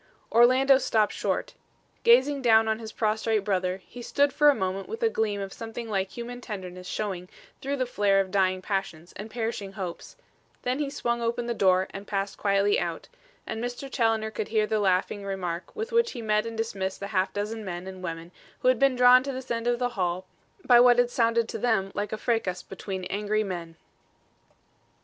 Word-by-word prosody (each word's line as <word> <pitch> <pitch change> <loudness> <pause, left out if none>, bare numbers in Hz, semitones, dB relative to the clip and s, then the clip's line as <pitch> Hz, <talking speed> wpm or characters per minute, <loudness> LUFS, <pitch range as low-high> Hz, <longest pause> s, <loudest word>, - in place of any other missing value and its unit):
Orlando 260 +3 +6
stopped 215 -5 +1
short. - - -2 0.5
Gazing 265 +4 +4
down 225 -2 +5
on 220 0 0
his 220 -1 -7
prostrate 220 -1 0
brother, 185 -2 0
he 245 - -10
stood 280 +3 +1
for 295 0 +5
a 290 - +4
moment 190 -1 -3
with 450 +2 -5
a 455 - +4
gleam 215 - -1
of 195 -1 -5
something 230 +1 -7
like 195 -3 -1
human 245 +2 -7
tenderness 185 -5 -7
showing 185 -4 -4 0.3
through 275 +1 -2
the 255 - 0
flare 205 -4 +2
of 190 -1 -1
dying 185 -1 +1
passions 180 -4 -3
and 210 +3 -7
perishing 220 -4 -4
hopes; 185 -4 -6 0.5
then 250 +3 -1
he 290 -2 -1
swung 235 -4 -2
open 235 +1 -1
the 240 - -1
door 185 -3 +3
and 200 +1 -8
passed 195 0 -3
quietly 200 0 +2
out, - - -4 0.4
and 220 +1 -4
Mr. 245 +3 -4
Challoner 225 -2 +1
could 215 - -4
hear 215 -1 +2
the 215 0 0
laughing 195 +1 +1
remark 185 - -4
with 450 +2 -4
which 470 0 +2
he 240 - -6
met 215 0 +1
and 230 -1 -6
dismissed 195 -4 -3
the 200 - -5
half 190 0 +1
dozen 210 +3 -4
men 175 -2 -5
and 190 -1 -8
women 165 -1 -6 0.3
who 255 - +4
had 255 -3 +3
been 275 -1 +4
drawn 250 0 +7
to 275 +1 -4
this 260 -1 -7
end 230 0 -1
of 240 0 +2
the 245 0 0
hall 185 -4 -2 0.4
by 245 -1 +7
what 245 0 +6
had 245 0 +3
sounded 230 -1 +2
to - - -5
them 215 -5 +1
like 205 0 -3
a 215 - -2
fracas 210 -6 -1
between 190 -1 -6
angry 210 +3 -1
men. 170 -4 -6
215 Hz, 200 wpm, -27 LUFS, 195-240 Hz, 0.5 s, drawn